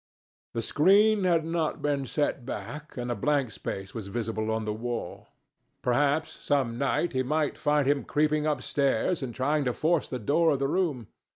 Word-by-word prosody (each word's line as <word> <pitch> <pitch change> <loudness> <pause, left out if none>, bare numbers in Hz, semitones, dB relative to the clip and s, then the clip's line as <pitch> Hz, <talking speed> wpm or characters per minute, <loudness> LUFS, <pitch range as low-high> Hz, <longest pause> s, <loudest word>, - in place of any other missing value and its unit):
The 115 - -1
screen 200 - +4
had 165 -3 +3
not 165 -2 -1
been 140 -2 0
set 145 -3 -1
back, 150 +4 -7
and 120 0 -3
a - - -1
blank 135 +2 +1
space 95 -1 -6
was 110 -4 -6
visible 110 0 -2
on 110 0 -1
the 105 - -1
wall. 120 +2 -5 0.6
Perhaps 145 +4 +1
some 135 -5 +1
night 140 +4 0
he 130 - +1
might 150 +3 0
find 150 -2 +1
him 140 0 +2
creeping 155 0 +1
upstairs 150 +2 0
and 125 -3 -5
trying 145 +3 +1
to 125 - +1
force 160 +3 +1
the 130 - -4
door 150 +8 +2
of 145 - +2
the 135 0 0
room. 150 -7 0
140 Hz, 180 wpm, -28 LUFS, 120-155 Hz, 0.6 s, screen